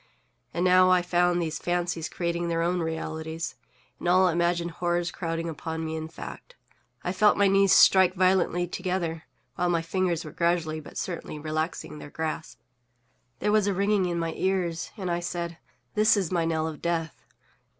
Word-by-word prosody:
And 175 - -1
now 185 0 +6
I 180 -1 +4
found 175 0 +2
these 160 -2 -2
fancies 175 -2 -1
creating 170 0 -2
their 165 0 0
own 175 +1 +1
realities, 160 0 -4 0.5
and - - -4
all 185 +1 +5
imagined 170 0 0
horrors 175 0 -1
crowding 165 -1 -3
upon 160 0 -4
me 160 0 -3
in 160 0 -4
fact. 335 - -10 0.5
I 180 - -1
felt 205 +3 +4
my 200 - +5
knees 195 0 +4
strike 190 -1 +6
violently 185 -1 +2
together, 175 -2 -3 0.3
while 175 0 +1
my 170 -1 +1
fingers 175 -1 -1
were 155 - -7
gradually 170 -2 0
but 150 - -11
certainly 170 -3 -4
relaxing 155 0 -3
their 145 - -9
grasp. 155 -5 -4 0.8
There 210 - 0
was 210 -1 +3
a 200 - +1
ringing 200 -1 +2
in 175 -1 -2
my 165 -1 -2
ears, 180 -3 -1
and 185 -3 -3
I 170 - 0
said, 170 -1 -4 0.3
"This 215 0 +4
is 190 -4 -1
my 170 -2 +1
knell 160 -1 0
of 155 -2 -7
death!" 165 -2 -2
175 Hz, 175 wpm, -27 LUFS, 165-185 Hz, 0.8 s, now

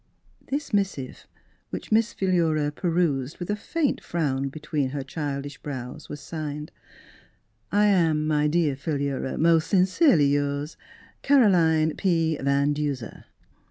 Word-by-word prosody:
This 285 -2 -3
missive, 135 - -2 0.4
which - - -7
jNIiss 225 +1 +2
Philura 165 -6 +1
pe 175 - -4
rused 155 -5 0
with 175 +3 -4
a - - +1
faint 295 +7 -1
frown 140 -5 -1
between 150 -1 -2
her 140 0 -4
child 140 0 -4
ish 145 -2 -9
brows, 130 -4 -7
was 150 - -6
signed, 150 0 -6 0.5
" 110 +2 -40
I 205 +1 +4
am, 165 -6 +3
my 150 -1 +2
dear 155 -3 +1
Philura, 140 -2 -2
most 165 0 +3
sincerely 185 - +4
yours, 145 +1 -1 0.5
Caroline 170 - +4
P. 165 -4 +1
Van 140 +1 +2
Duser." 145 -6 -4
155 Hz, 135 wpm, -25 LUFS, 140-175 Hz, 0.5 s, I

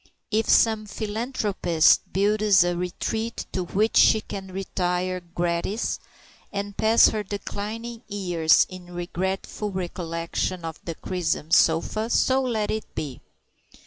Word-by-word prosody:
If 220 +1 +1
some 220 -2 +4
philanthropist 210 -5 +1
builds 205 0 +4
a 175 0 0
retreat 220 +6 -3
to 185 - -2
which 210 +5 +1
she 220 - +6
can 195 -2 -7
retire 185 -1 -2
gratis, 175 +4 -2 0.5
and 200 0 -4
pass 220 +2 +5
her 215 - -2
declining 215 +3 -5
years 175 -6 +3
in 180 -1 -11
regretful 190 +4 -3
recollection 175 -1 -3
of 160 -1 -7
the 165 - -4
crimson 165 -3 -2
sofa, 170 +8 +3
so 260 +2 +3
let 225 -5 -1
it 220 0 -3
be. 140 -5 -5
190 Hz, 120 wpm, -25 LUFS, 175-215 Hz, 0.5 s, she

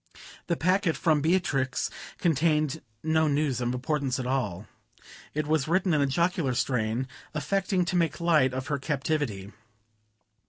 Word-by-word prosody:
The 170 - 0
packet 185 -1 +2
from 155 -3 +2
Beatrix 145 -6 +1 0.3
contained 155 -2 +1 0.2
no 160 0 +2
news 145 -3 0
of 120 0 0
importance 130 +1 -1
at 130 - -3
all. 110 -8 -1 0.7
It 155 0 0
was 155 -2 +1
written 180 +1 +2
in 150 - +3
a 140 - +3
jocular 165 -2 +1
strain, 120 0 0 0.3
affecting 185 +4 0
to 180 - -2
make 165 -4 +1
light 155 -6 +3
of 130 +1 -4
her 145 -1 -2
captivity. 135 -8 -2
150 Hz, 145 wpm, -27 LUFS, 130-165 Hz, 0.7 s, in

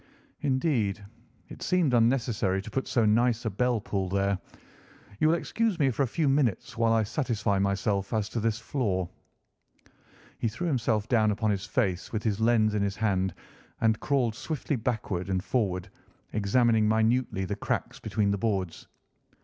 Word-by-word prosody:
"Indeed, 130 - 0 0.4
it - - -11
seemed 175 -8 +2
unnecessary 115 -5 +2
to 110 - -9
put 135 +4 -2
so 115 -3 +2
nice 120 +2 +2
a 110 - 0
bell 125 +3 +1
pull 95 -2 -2
there. 100 0 +1 0.8
You 155 - +4
will 160 - +4
excuse 220 +3 -1
me 140 -5 +3
for 120 - -2
a 135 - +3
few 150 +5 0
minutes 135 -8 +1
while 115 -1 +2
I 115 -1 +3
satisfy 110 -4 -1
myself 100 0 0
as 110 -2 0
to 115 - -3
this 110 0 0
floor." 100 -11 -1 1.3
He - - 0
threw 120 +11 -4
himself 115 -8 0
down 110 -3 +3
upon 105 +1 +1
his 100 0 -2
face 95 -5 -1
with 110 -2 -2
his 105 -2 0
lens 110 -2 +3
in 105 - 0
his 100 0 -1
hand 95 -4 0 0.4
and 110 -1 +2
crawled 130 -6 +1
swiftly 150 +4 -3
backward 110 -6 -2
and 95 -1 0
forward, 95 -7 -1 0.5
examining 110 +1 +3
minutely 110 -2 +1
the 100 - -3
cracks - - -3
between 100 -2 0
the 100 - -1
boards. 95 -6 -2
110 Hz, 165 wpm, -28 LUFS, 100-125 Hz, 1.3 s, You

